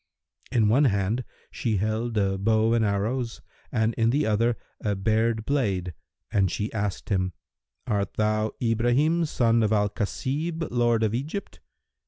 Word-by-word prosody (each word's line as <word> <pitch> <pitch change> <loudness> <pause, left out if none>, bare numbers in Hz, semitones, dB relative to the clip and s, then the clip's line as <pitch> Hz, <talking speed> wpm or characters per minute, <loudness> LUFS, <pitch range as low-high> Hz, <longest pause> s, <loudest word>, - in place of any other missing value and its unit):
In 115 -5 +3
one 130 +8 +4
hand 105 +2 +1 0.3
she 110 -4 -1
held 110 +3 -1
a 100 -1 +2
bow 110 +2 +3
and 115 -1 +3
arrows 110 +4 -1 0.3
and 110 +1 +1
in 115 0 +4
the 140 +5 +2
other 115 +2 +2 0.3
a 105 -1 0
bared 110 +2 +1
blade, 100 -11 0 0.4
and 95 -2 +2
she 105 +4 -3
asked 105 -3 -3
him, 95 -3 0 0.5
"Art 100 -2 -1
thou 110 0 +1
Ibrahim, 125 +8 +2
son 115 -6 +2
of 110 -1 +1
al 105 -1 +2
Khasib, 145 +10 -2
lord 120 -2 +2
of 110 -1 +1
Egypt?" 150 - -4
110 Hz, 150 wpm, -26 LUFS, 105-120 Hz, 0.5 s, one